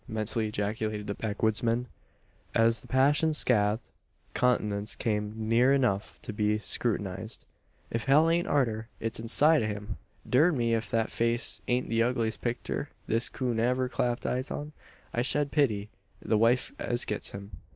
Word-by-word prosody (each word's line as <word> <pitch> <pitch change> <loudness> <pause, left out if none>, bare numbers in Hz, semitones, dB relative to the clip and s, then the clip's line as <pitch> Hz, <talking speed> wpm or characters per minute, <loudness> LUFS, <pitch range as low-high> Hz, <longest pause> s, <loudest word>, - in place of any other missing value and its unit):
mentally 110 0 -1
ejaculated 105 0 -2
the 100 - -2
backwoodsman, 110 +3 0 0.7
as 115 0 +4
the - - -14
passion 145 +4 +3
scathed 110 -5 +1 0.4
countenance 105 -4 0
came 105 -2 -1 0.2
near 120 +4 +4
enough 110 -7 0
to 110 - -5
be 105 0 +1
scrutinised. 105 -1 -3 0.5
"If 115 - -2
hell 145 +4 +5
ain't 170 +1 +2
arter, 115 -6 0
it's 115 0 -3
inside 145 +7 +4
o' 110 - 0
him! 105 0 -5 0.3
Durn 150 +5 +4
me, 115 -1 +1
ef 115 -1 0
thet 115 +1 -1
face 115 +1 0
ain't 125 +1 +1
the 115 0 +1
ugliest 115 -2 0
picter 120 0 -3 0.2
this 115 +2 +1
coon 125 -4 -2
ever 125 +2 +1
clapped 125 -1 -1
eyes 130 +2 -1
on. 150 +1 -5 0.4
I 120 - +1
shed 140 +3 +1
pity 110 -9 +1 0.3
the 110 - 0
wife 120 +3 +3
as 120 0 -1
gets 105 - -3
him. 100 +1 -9
115 Hz, 155 wpm, -29 LUFS, 105-125 Hz, 0.7 s, hell